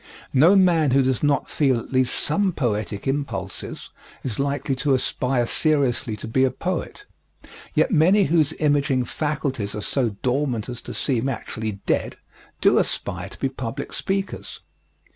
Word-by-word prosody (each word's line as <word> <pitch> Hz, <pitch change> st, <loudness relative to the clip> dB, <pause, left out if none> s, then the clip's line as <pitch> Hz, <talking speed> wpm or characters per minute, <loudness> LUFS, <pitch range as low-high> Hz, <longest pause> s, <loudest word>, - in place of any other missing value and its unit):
No 160 Hz, +9 st, +6 dB
man 170 Hz, -6 st, +4 dB
who 135 Hz, +1 st, +4 dB
does 130 Hz, -1 st, 0 dB
not 145 Hz, -1 st, +1 dB
feel 135 Hz, -5 st, +2 dB
at 115 Hz, -, -7 dB
least 130 Hz, -1 st, +2 dB
some 190 Hz, +4 st, +1 dB
poetic 110 Hz, -7 st, -2 dB
impulses 120 Hz, -9 st, -4 dB, 0.3 s
is 120 Hz, -3 st, -4 dB
likely 140 Hz, 0 st, -1 dB
to 135 Hz, +1 st, +2 dB
aspire 125 Hz, -1 st, 0 dB
seriously 135 Hz, -6 st, +1 dB
to 105 Hz, -, -7 dB
be 130 Hz, +4 st, +2 dB
a 130 Hz, -, +4 dB
poet, 185 Hz, -, -4 dB, 0.7 s
yet -, -, +3 dB
many 185 Hz, +4 st, +5 dB
whose 160 Hz, -4 st, +3 dB
imaging 145 Hz, -4 st, +1 dB
faculties 140 Hz, -10 st, -2 dB
are 105 Hz, -, -4 dB
so 125 Hz, +2 st, 0 dB
dormant 125 Hz, -3 st, 0 dB
as 125 Hz, -1 st, -6 dB
to -, -, -7 dB
seem 130 Hz, -1 st, 0 dB
actually 110 Hz, -3 st, -4 dB
dead -, -, 0 dB, 0.5 s
do -, -, +5 dB
aspire -, -, -2 dB
to -, -, -12 dB
be -, -, +1 dB
public 130 Hz, +1 st, -5 dB
speakers. 195 Hz, 0 st, -3 dB
135 Hz, 155 wpm, -23 LUFS, 120-150 Hz, 0.7 s, No